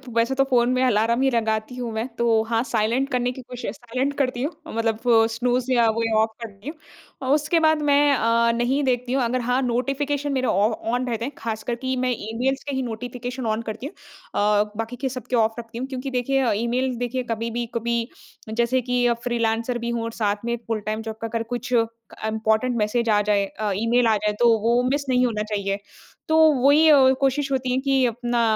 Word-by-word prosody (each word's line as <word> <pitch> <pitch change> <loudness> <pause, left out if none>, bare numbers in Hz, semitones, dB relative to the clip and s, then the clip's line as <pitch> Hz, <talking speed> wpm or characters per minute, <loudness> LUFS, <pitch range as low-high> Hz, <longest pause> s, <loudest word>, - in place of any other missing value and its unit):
वैसे 235 +3 +2
तो 270 - +4
फ़ोन 245 -2 +3
में 255 0 +1
अलार्म 235 0 +2
ही 270 - +3
लगाती 220 0 -1
हूँ 245 -2 -4
मैं 220 +2 -2
तो 230 -2 +3
हाँ 230 -1 +2
साइलेंट 240 +3 0
करने 250 0 0
की 260 - -9
कोशी 250 -3 -6
साइलेंट 255 +4 -3
करती 255 -3 0
हूँ 295 - -1 0.2
अ, - - -10
मतलब 225 -1 -1
वो 225 -2 +5
स्नूज़ 245 +2 -1
या 235 -2 +4
वो 230 - +1 0.2
ऑफ़ 220 - +1
करती 210 +3 -8
हूँ। 305 -4 -11
उसके 305 +3 +2
बाद 315 -1 +3
मैं 290 0 +4
अ, 230 -1 +2
नहीं 250 +4 +1
देखती 250 -1 0
हूँ, 265 -1 +2
अगर 245 +2 0
हाँ 250 +2 +1
नोटिफ़िकेशन 275 +4 -1
मेरे 260 -1 0
ऑ 200 +3 +3 0.2
ऑन 245 +2 0
रहते 230 -1 -2
हैं, 275 - -4
खासकर 225 +1 -3
कि 260 +2 -3
मैं 255 0 0 0.2
ईमेल्स 260 +4 -1
के 285 -2 -4
ही 265 - 0
नोटिफ़िकेशन 245 +2 -5
ऑन 220 0 0
करती 225 +2 -6
हूँ 290 - -6 0.4
अ, 210 0 +3
बाकी 225 +2 -4
के 265 - 0
सब 255 -1 -6
ऑफ़ 225 +1 +1
रखती 230 -1 -9
हूँ। 255 +2 -3
क्योंकि 265 0 -5
देखिए 255 0 +1
ईमेल 250 +2 0
देखिए 245 +1 -2
कभी 230 +1 -2
भी, 240 +1 -2
कभी 235 0 -1 0.4
जैसे 235 +3 +1
कि 250 0 0 0.2
फ्रीलांसर 230 0 0
भी 235 0 -4
हूँ 235 -1 -2
और 230 - -4
साथ 210 -1 -2
में 235 0 0
फुल 225 -1 -1
टाइम 215 +1 -2
जॉब 220 -1 -6
का 225 - -2
अगर 225 0 -2
कुछ 245 +1 -4
इम्पोर्टेंट 225 0 -1
मैसेज 230 +2 0
आ 210 -1 +4
जाए 205 -1 +1
अ, 210 +1 -4
ईमेल 230 +3 +2
आ 220 - +4
जाए, 210 +1 -1
तो 235 -2 +5
वो 235 +3 +2
मिस 285 +1 -1
नहीं 250 0 +3
होना 215 -3 -1
चाहिए। 200 -2 -2 0.5
तो 315 - +3 0.2
वही 285 +4 +5
अ, 270 -3 +7
कोशिश 275 +1 0
होती 260 -1 0
है 250 - +1
कि 270 -1 +2
अपना 240 0 -1
240 Hz, 215 wpm, -23 LUFS, 225-260 Hz, 0.5 s, अ